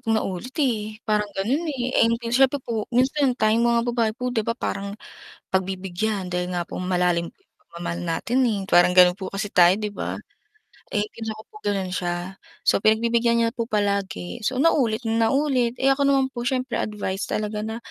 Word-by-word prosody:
'tong 225 -1 +1
naulit 195 +5 -4
eh, 220 -8 0
parang 210 -1 +1
ganun, 265 - 0
eh 255 -3 0
'di 230 0 -2
siyempre 265 +2 +4
po 225 -3 -3
minsan 260 +1 +2
tayong 225 +1 +3
mga 235 0 +3
babae 230 -2 +1
po 250 -1 -3
'di 230 - +1
ba 230 +2 -2
parang 200 -4 -4 0.5
pagbibigyan 190 +1 -2
dahil 180 0 -2
nga 175 - 0
po 170 - -6
malalim 180 -2 0
po - - -45
'yung - - -43
pagmamahal 175 - -6
natin, 245 +10 +1
eh, 215 -4 0
parang 175 -1 +5
gano'n 180 0 +6
po 195 - -6
kasi 195 +1 -3
tayo 175 -2 +6
'di 210 - -2
ba. 205 - -4 0.8
Eh, 205 - +2
pinsan 220 -1 -5
ko 215 - -11
po - - -21
gano'n 195 -2 -1
siya, 175 +1 -3 0.3
so - - +4
pinagbibigyan 235 +2 +3
niya 230 - +1
po 230 -3 -3
palagi, 200 -1 -1
so 260 - -1
naulit 255 -6 +2
na 225 0 +2
naulit, 265 -4 +1
eh, 270 +1 +3
ako 275 - -4
naman 270 -1 +2
po 240 - -4
siyempre 255 -2 -1
advice 205 -2 -3
talaga 210 0 -2
na 220 +1 -4
220 Hz, 190 wpm, -24 LUFS, 190-245 Hz, 0.8 s, gano'n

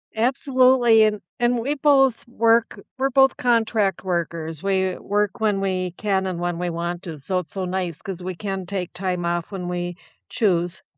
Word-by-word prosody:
Absolutely. 255 -1 +4
And 210 -1 +2 0.2
and 240 0 +2
we 265 +6 -1
both 270 -5 +3
work 230 -1 +2 0.2
we're 270 - +2
both 270 0 +4
contract 225 -6 +1
workers. 165 -3 -3
We 190 -2 0
work 205 +3 -1
when 210 -3 +1
we 185 -2 -1
can 195 -2 0
and 180 -2 -3
when 175 -1 -2
we 180 0 -1
want 170 +1 -3
to. 165 -4 -7
So 180 +7 -2
it's 165 -4 -9
so 190 -2 -3
nice 180 -3 -3
'cause 190 -4 -6
we 185 0 -5
can 195 0 -4
take 180 -2 -4
time 180 -1 -2
off 170 +1 -2
when 185 -3 -5
we 175 0 -3 0.3
choose. 175 -6 0
190 Hz, 180 wpm, -23 LUFS, 175-225 Hz, 0.3 s, Absolutely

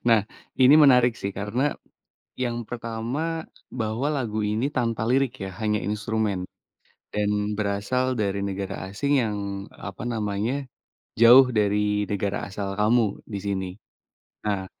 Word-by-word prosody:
Nah, 115 -2 +6 0.4
ini 130 +3 +8
menarik 125 -5 +6
sih 100 -2 -4
karena, 115 +9 -1 0.7
yang 120 -2 -2
pertama, 120 +8 -3 0.2
bahwa 115 +3 -2
lagu 110 -4 -2
ini 110 +6 0
tanpa 115 -3 0
lirik 130 -1 +2
ya, - - -5
hanya 105 -1 +1
instrumen, 105 -1 -1 0.7
dan 105 0 0
berasal 110 +5 0
dari 100 -1 0
negara 95 -1 -3 0.2
asing 140 +8 0
yang, 105 -2 -2 0.3
apa 95 +2 -8
namanya, 115 +4 -2 0.5
jauh 125 +2 +8
dari 105 -1 +1
negara 100 0 -2
asal 100 0 -4
kamu, 110 -1 +2
di 100 -3 -4
sini. 95 -2 -2 0.8
Nah, 100 -2 -1
110 Hz, 125 wpm, -25 LUFS, 100-125 Hz, 0.8 s, ini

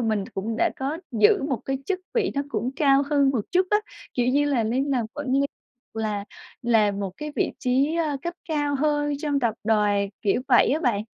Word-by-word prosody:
mình 215 -4 0
cũng 220 +4 -3
đã 345 +4 +2
có 275 +4 -3
giữ 215 +2 +4
một 275 -3 0
cái 270 0 -2
chức 385 -1 -1
vị 445 -5 +1
nó 280 - 0
cũng 235 -1 -2
cao 275 -2 +4
hơn 280 -2 +4
một 255 -4 0
chút 365 +1 +3
á, 420 - +5 0.4
kiểu 245 -1 +1
như 280 +3 +3
là, 275 -5 +1
lên 245 +5 0
làm 245 -5 0
quản 290 -1 -5
lý 270 - +3 0.5
là 215 -2 -2 0.4
làm 215 -4 +2
một 195 -2 -2
cái 300 0 -6
vị - - +1
trí, 270 +5 +1
ơ, 310 -4 0
cấp 345 +2 -3
cao 290 -2 0
hơn 295 +1 +1
trong 290 -2 0
tập 235 -4 +1
đoàn, 205 -2 +2
kiểu, 210 +3 +1
vậy 245 - +5
á 305 - 0
bạn. 235 -9 +1
270 Hz, 215 wpm, -25 LUFS, 225-290 Hz, 0.5 s, á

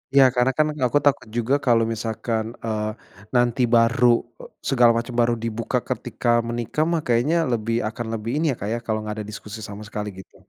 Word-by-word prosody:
Iya, 140 - +8
karena 125 +1 +3
kan 155 0 +4 0.2
aku 145 - +2
takut 140 -5 +2
juga 120 +3 +1
kalau 115 -2 +5
misalkan, 110 0 -2 0.2
eee, 110 -1 -1 0.5
nanti 120 0 +2
baru 115 +2 +4 0.6
segala 120 -3 +5
macam 120 +1 -4
baru 120 0 +3
dibuka 115 0 -1
ketika - - -4 0.2
menikah 120 +5 -1
mah 165 -2 +1
kayaknya 120 +7 +2 0.2
lebih 115 0 -1
akan 115 +2 -5
lebih 115 +1 -3
ini 155 +2 0
ya - - -3
Kak 100 - -3
ya - - 0
kalau 110 -1 0
nggak 105 0 -5
ada 105 -1 -5
diskusi 105 +1 -8
sama 105 +1 -8
sekali 105 0 -4
gitu. 95 - -14
115 Hz, 190 wpm, -23 LUFS, 110-125 Hz, 0.6 s, Iya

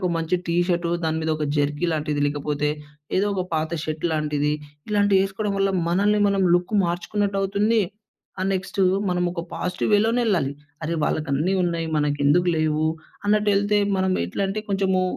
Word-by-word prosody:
ఒక 180 - 0
మంచి 165 +2 0
T 170 - -1
shirt 175 -1 0
దాని 160 0 0
మీద 160 0 -1
ఒక 155 - -2
జెర్కీ 145 +4 0
లాంటిది, 150 -1 -1
లేకపోతే 145 0 -1 0.5
ఏదో 195 +2 +2
ఒక 185 - 0
పాత 160 0 0
షర్ట్‌లాంటిది 150 -2 -1 0.4
ఇలాంటివి 205 -2 +3
వేసుకోవడం 195 +2 -2
వల్ల 195 0 +2 0.2
మనల్ని 205 +4 +2
మనం 200 -1 +1
లుక్ 175 +4 0
మార్చుకున్నట్టు 195 +4 -1
అవుతుంది. 200 +4 +1 0.6
ఆహ్, 190 - 0
నెక్స్టు 195 +1 -1 0.3
మనమొక 180 -1 -1
పాజిటివ్ 180 +3 -2
వేలోనే 225 +4 +3
ఎళ్ళాలి. 165 -10 +1 0.3
అరే 165 +1 -1
వాళ్ళకన్నీ 155 +5 0
ఉన్నాయి, 170 -2 -1
మనకేందుకు 145 +4 +2
లేవు, 155 0 +1 0.4
అన్నట్టు 210 0 +3
ఏళ్తే 205 +1 +2 0.2
మనం 190 0 +1
ఎట్లంటే 195 - -2
కొంచెము 190 -2 +1
180 Hz, 150 wpm, -23 LUFS, 155-195 Hz, 0.6 s, ఇలాంటివి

